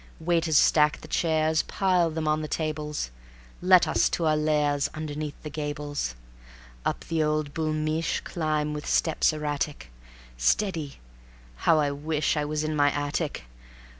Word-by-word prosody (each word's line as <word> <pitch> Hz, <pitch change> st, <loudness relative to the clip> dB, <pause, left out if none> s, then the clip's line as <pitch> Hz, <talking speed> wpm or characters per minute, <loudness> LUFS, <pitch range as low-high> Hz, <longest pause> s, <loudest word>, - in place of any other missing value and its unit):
Waiters 165 Hz, -2 st, +2 dB
stack 150 Hz, 0 st, +4 dB
the -, -, -10 dB
chairs, 160 Hz, -1 st, +2 dB
Pile 180 Hz, -3 st, +1 dB
them 160 Hz, -1 st, -3 dB
on 155 Hz, 0 st, +1 dB
the 155 Hz, -, -4 dB
tables; 150 Hz, -, -3 dB, 0.5 s
Let 185 Hz, 0 st, +6 dB
us -, -, +2 dB
to 170 Hz, -, -1 dB
our 155 Hz, -1 st, +3 dB
lairs 150 Hz, -2 st, +1 dB
Underneath 150 Hz, -1 st, -5 dB
the 150 Hz, -, -6 dB
gables. 145 Hz, -, -3 dB, 0.7 s
Up -, -, -2 dB
the 165 Hz, -1 st, 0 dB
old 150 Hz, -1 st, 0 dB
Boul' 155 Hz, 0 st, -1 dB
Mich' 155 Hz, +1 st, -1 dB
Climb 155 Hz, -2 st, -1 dB
with 150 Hz, 0 st, -6 dB
steps 160 Hz, 0 st, +2 dB
erratic. 150 Hz, -, -3 dB, 0.5 s
Steady... 160 Hz, -, 0 dB, 0.6 s
how 160 Hz, -, +3 dB
I 145 Hz, -2 st, +2 dB
wish 150 Hz, +2 st, -1 dB
I 150 Hz, -1 st, 0 dB
was 150 Hz, +1 st, -2 dB
in 155 Hz, 0 st, -1 dB
my 145 Hz, -1 st, +4 dB
attic! 145 Hz, -, -2 dB
155 Hz, 150 wpm, -26 LUFS, 150-160 Hz, 0.7 s, Let